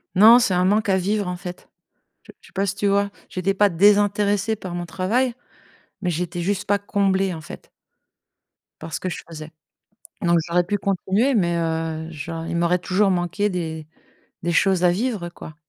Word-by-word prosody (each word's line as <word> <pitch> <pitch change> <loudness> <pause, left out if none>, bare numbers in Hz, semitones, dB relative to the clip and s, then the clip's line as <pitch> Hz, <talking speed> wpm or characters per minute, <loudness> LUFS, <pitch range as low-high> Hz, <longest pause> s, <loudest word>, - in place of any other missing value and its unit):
Non, 225 +6 +8
c'est 205 -6 +1
un 180 +1 +2
manque 210 +2 +2
à 190 - +3
vivre, 200 +2 -1
en 180 0 -3
fait. 180 0 -9 0.6
Je - - -13
je - - -18
sais - - -21
pas, 195 +1 0
si 200 0 -2
tu 205 0 0
vois? 200 0 +2 0.2
J'étais 190 +1 -1
pas 205 +1 +3
désintéressée 205 +3 +3
par 185 -4 -7
mon 175 0 -4
travail, 225 +9 0 0.7
mais 180 -3 -1
j'étais 175 +1 -3
juste 190 +2 -1
pas 205 0 +2
comblée, 195 -2 0
en 160 - -7
fait - - -11 1.1
par 160 0 -8
ce - - -2
que 185 - -2
je 170 - -5
faisais, 155 -1 -9 0.7
donc 170 -1 +3
j'aurais 175 +1 +2
pu 205 +4 -1
continuer, 200 +7 +1
mais 175 -6 +1
heu, 160 -1 -2
je 155 +1 -7 0.2
il - - -2
m'aurait 170 +1 +2
toujours 195 +2 +1
manqué 180 +3 0
des 160 -4 -4 0.6
des 175 - -1
choses 190 0 +2
à 175 - +6
vivre, 205 -2 -2
quoi. 160 -2 -11
185 Hz, 190 wpm, -22 LUFS, 175-205 Hz, 1.1 s, Non